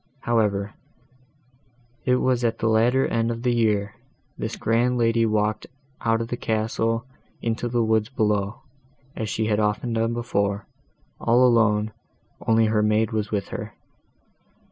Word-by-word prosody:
However, 105 -3 0 1.3
it 125 - +4
was 125 -1 +1
at 115 -1 +1
the 115 - -1
latter 120 +4 +3
end 115 0 0
of 115 0 -4
the 125 -1 +2
year, 105 -3 +1 0.4
this - - -4
grand 120 +2 +1
lady 115 -1 +2
walked 105 0 0 0.3
out 115 0 +1
of 115 - -4
the 120 - -3
castle 115 +1 -1 0.3
into 115 +1 -2
the 120 -1 +1
woods 110 0 +1
below, 105 -4 -1 0.5
as 110 - -3
she 110 - -1
had 105 -1 +1
often 110 +3 0
done 115 +1 0
before, 100 -4 -1 0.5
all 120 +2 +4
alone, 110 -3 +3 0.6
only 115 0 +4
her 110 0 +2
maid 110 +1 +2
was 110 -2 -2
with 100 -2 -2
her. - - -6
115 Hz, 145 wpm, -24 LUFS, 105-115 Hz, 1.3 s, it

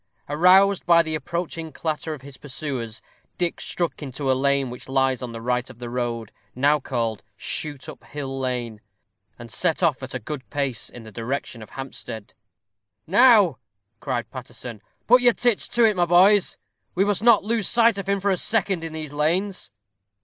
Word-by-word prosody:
Aroused 185 +6 +5
by 170 -1 +6
the 160 -1 -3
approaching 165 0 -4
clatter 160 0 -3
of 135 - -15
his 140 -1 -10
pursuers, 130 -5 -5 0.3
Dick 175 -1 -1
struck 170 -2 -3
into 135 -1 -2
a - - +5
lane 135 -1 +1
which 125 - -10
lies 135 -1 +1
on 125 -2 -5
the 115 0 -8
right 125 +1 -1
of 130 - -12
the 120 -1 -7
road, 120 -3 -3 0.2
now 145 +4 +3
called 115 -5 -2 0.2
Shoot 150 -5 -4
up - - -10
hill 135 -2 -5
Lane, 120 -4 -3 0.6
and 120 -1 -10
set - - +1
off - - +2
at - - -6
a - - -2
good 140 +3 -7
pace 140 -6 -1
in 120 - -11
the 110 - -11
direction 115 +2 -4
of 110 - -11
Hampstead. 120 -5 -7 0.7
"Now," 200 - +5 0.4
cried 125 -4 -3
Paterson, 120 -3 -8 0.2
"put 250 +2 +6
your 245 -1 +5
tits 240 -3 +1
to 240 - +2
it, 215 -2 +3
my 175 -1 +2
boys. 185 +3 +5 0.4
We 190 +2 +3
must 205 -1 0
not 230 -3 +5
lose 220 -1 0
sight 230 -3 +4
of 195 - -5
him 200 0 +2
for 200 +1 +1
a 185 - +1
second 195 -4 +1
in 165 -1 -6
these 155 -2 -6
lanes." 170 - 0
145 Hz, 185 wpm, -24 LUFS, 125-185 Hz, 0.7 s, by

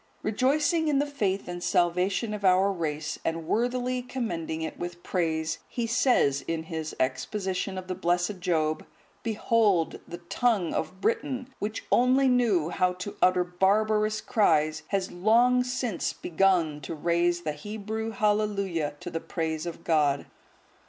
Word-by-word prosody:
Rejoicing 290 +8 +2
in 295 -2 +2
the 285 - +2
faith 205 -10 -2
and 175 0 -5
salvation 180 +5 +1
of 210 -1 -5
our 190 +1 +4
race, 155 -4 -3
and 165 0 -2
worthily 250 +2 0
commending 175 -11 -3
it 160 - -5
with 175 0 -6
praise, 160 -3 -1
he 235 - -3
says, 230 - +2
in 165 -1 -2
his 160 -1 -5
exposition 190 +8 -2
of 185 0 -6
the 185 - -2
blessed 175 +2 0
Job, 160 -4 0 0.4
"Behold, 215 -5 +1
the 175 - -7
tongue 190 +1 0
of 190 - -3
Britain, 260 +2 -1
which 215 +2 -4
only 255 +2 +4
knew 225 -11 +2
how 180 +1 +1
to 185 +3 -7
utter 185 0 +4
barbarous 215 +4 +1
cries, 155 -7 +2
has 195 -2 -1
long 235 +7 +4
since 250 -5 -2
begun 170 -4 +1
to 155 +4 -5
raise 170 +2 +1
the 155 - -1
Hebrew 215 +6 -5
Hallelujah 200 -7 0
to 175 -1 -6
the 165 - -2
praise 160 -1 -3
of 170 0 -7
God! 150 -4 +2
185 Hz, 145 wpm, -27 LUFS, 165-220 Hz, 0.4 s, our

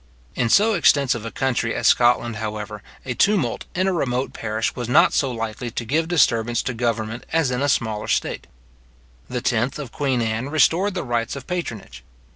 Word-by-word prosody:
In 120 - 0
so 215 - +4
extensive 140 - +3
a - - -4
country 120 -1 -1
as - - -3
Scotland, 120 -2 +3
however, 105 -1 -5 0.2
a 130 - -2
tumult 165 - +1
in 185 +1 +1
a 190 - +1
remote 130 -5 -1
parish 110 0 -2
was 120 -1 -4
not - - +5
so 135 - +1
likely 115 0 -4
to 115 +1 -5
give 160 +7 0
disturbance 120 -9 +2
to 130 - -2
government 115 -1 -2
as 160 -5 +1
in 125 +1 -1
a 145 - +1
smaller 110 -5 -1
state. - - -1 0.8
The 125 -1 -3
10th 120 +2 0
of 140 -6 -7
queen 135 -4 0
Anne 115 +3 -2
restored 165 +7 +2
the 180 - -2
rights 120 -2 -2
of 140 - -8
patronage. 120 - -5
125 Hz, 185 wpm, -22 LUFS, 115-145 Hz, 0.8 s, not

